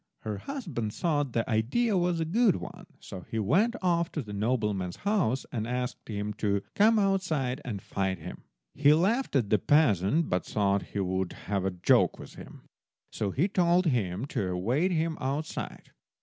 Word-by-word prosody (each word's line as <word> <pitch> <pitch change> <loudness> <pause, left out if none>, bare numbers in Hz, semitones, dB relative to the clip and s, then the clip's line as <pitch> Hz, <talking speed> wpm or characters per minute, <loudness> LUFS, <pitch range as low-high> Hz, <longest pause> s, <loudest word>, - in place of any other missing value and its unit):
Her 105 -2 -4
husband 165 - -4
thought 145 -7 0
the 115 - 0
idea 130 - +1
was 175 -2 +1
a 160 - 0
good 210 +5 +3
one, 180 0 -8
so 95 -3 -9
he 115 - -3
went 185 - +2
off 170 -1 +1
to 150 - -2
the 105 -2 -8
nobleman's 105 -4 -1
house 180 - +1
and 110 -2 -3
asked 125 0 -4
him 105 -1 -3
to 100 -2 +1
come 220 +2 +4
outside 185 -10 0
and 105 -7 -5
fight 95 -1 -2
him. 80 - -9 0.3
He 145 +1 +5
laughed 210 - +1
at 115 -7 +1
the 105 - +4
peasant, 145 - +3
but 90 - 0
thought 100 -1 +1 0.2
he - - +1
would 95 -1 -1
have 100 -2 -1
a - - +2
joke 90 -1 +3
with - - -11
him, - - -12 0.5
so 105 - -2
he 150 - +1
told 180 -2 +2
him 110 - 0
to 100 -8 -2
await 115 - 0
him 165 -1 -1
outside. 140 +4 -4
130 Hz, 180 wpm, -28 LUFS, -, 0.5 s, He